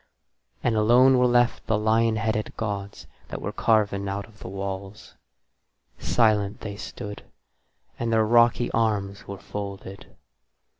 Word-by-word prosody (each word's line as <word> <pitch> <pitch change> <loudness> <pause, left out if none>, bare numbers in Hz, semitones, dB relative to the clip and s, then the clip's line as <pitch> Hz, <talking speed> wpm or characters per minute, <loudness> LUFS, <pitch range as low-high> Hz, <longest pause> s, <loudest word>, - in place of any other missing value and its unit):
And 120 - +1
alone 125 +4 +5
were 125 - +4
left 120 0 +2
the 110 - +2
lion 110 +1 +2
headed 110 0 -2
gods 100 -2 -4 0.2
that - - -6
were - - -4
carven 100 -3 +1
out 100 +1 -4
of 110 -1 -21
the - - -9
walls; 95 +1 -6 0.9
silent 105 -4 +1
they 100 -2 -6
stood, 105 0 -7 0.8
and 115 -1 -1
their 110 -1 +3
rocky 120 +1 +3
arms 100 -3 -1
were 100 - -6
folded. 100 0 -7
105 Hz, 135 wpm, -25 LUFS, 100-115 Hz, 0.9 s, alone